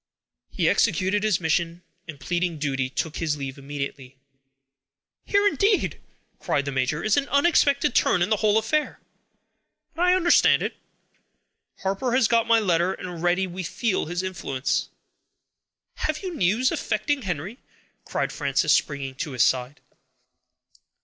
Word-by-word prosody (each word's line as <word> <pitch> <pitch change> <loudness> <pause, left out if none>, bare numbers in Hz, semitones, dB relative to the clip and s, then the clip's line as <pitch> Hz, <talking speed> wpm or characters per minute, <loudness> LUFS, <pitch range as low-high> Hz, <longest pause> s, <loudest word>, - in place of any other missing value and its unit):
He - - 0
executed 190 +2 +2
his 215 -3 +1
mission, 170 +1 -1 0.2
and, 150 -4 -9
pleading 175 +1 -2
duty, 135 -3 -2
took 155 +3 -3
his 155 -3 -1
leave 135 -1 -6
immediately. 140 -2 -6 1.1
"Here, 405 0 +3
indeed!" 405 0 +1 0.4
cried 140 - -1
the 140 - -3
major, 135 +3 -1
"is 215 +3 +2
an 280 -1 0
unexpected 280 -3 +3
turn 180 - +3
in 180 - -2
the 215 - +3
whole 215 0 +2
affair; 260 +8 -1 0.9
but 335 - -6
I 360 0 +5
understand 350 -2 +4
it: - - -3 1.1
Harper 195 +6 -1
has 260 -4 +4
got 230 0 +2
my 230 -1 +5
letter, 180 -2 +1
and - - -8
already 175 +2 0
we 185 +1 -6
feel 185 +1 -1
his 175 +2 -3
influence." 150 -8 -2 1.1
"Have 310 +4 -2
you 370 -2 -4
news 220 - +1
affecting 275 +7 -1
Henry?" 185 - -5 0.4
cried - - -2
Frances, - - +1
springing 140 -3 -1
to 150 -1 -4
his 125 -2 +3
side. 130 +2 0
180 Hz, 145 wpm, -24 LUFS, 150-230 Hz, 1.1 s, I